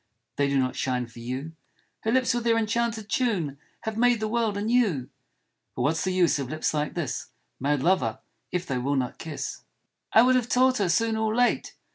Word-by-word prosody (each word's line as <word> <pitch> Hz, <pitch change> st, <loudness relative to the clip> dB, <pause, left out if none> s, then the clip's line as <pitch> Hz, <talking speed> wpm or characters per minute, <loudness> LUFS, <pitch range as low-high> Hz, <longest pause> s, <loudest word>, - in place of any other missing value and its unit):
" 115 Hz, -, -54 dB
They 140 Hz, 0 st, +2 dB
do 140 Hz, 0 st, +1 dB
not 130 Hz, -1 st, +1 dB
shine 125 Hz, -1 st, -1 dB
for 115 Hz, 0 st, -14 dB
you 130 Hz, +6 st, -4 dB, 0.3 s
" -, -, -41 dB
Her 220 Hz, -, +1 dB
lips 255 Hz, -1 st, +3 dB
with 240 Hz, -1 st, -1 dB
their 230 Hz, -1 st, +3 dB
enchanted 225 Hz, 0 st, 0 dB
tune 190 Hz, -, 0 dB, 0.2 s
Have 220 Hz, -1 st, -4 dB
made 245 Hz, -1 st, +4 dB
the 215 Hz, -, -1 dB
world 220 Hz, -2 st, 0 dB
anew! 205 Hz, -, +1 dB, 0.3 s
" -, -, -52 dB
But -, -, -1 dB
what's 160 Hz, +2 st, +1 dB
the 190 Hz, -, 0 dB
use 180 Hz, -5 st, +3 dB
of 135 Hz, -3 st, -4 dB
lips 155 Hz, +1 st, -1 dB
like 150 Hz, -1 st, -1 dB
this, 145 Hz, -8 st, -3 dB, 0.3 s
Mad 140 Hz, 0 st, 0 dB
lover, 185 Hz, +2 st, +2 dB, 0.3 s
if 180 Hz, 0 st, -1 dB
they 135 Hz, -6 st, -2 dB
will 140 Hz, +3 st, 0 dB
not 130 Hz, -2 st, -2 dB
kiss? 155 Hz, -3 st, -5 dB, 0.5 s
"I 225 Hz, -, +7 dB
would 255 Hz, +1 st, +4 dB
have 245 Hz, -2 st, +1 dB
taught 255 Hz, 0 st, +3 dB
her 195 Hz, -3 st, +1 dB
soon 225 Hz, +6 st, +2 dB
or 220 Hz, 0 st, 0 dB
late.' 245 Hz, 0 st, +1 dB
185 Hz, 215 wpm, -26 LUFS, 140-230 Hz, 0.5 s, I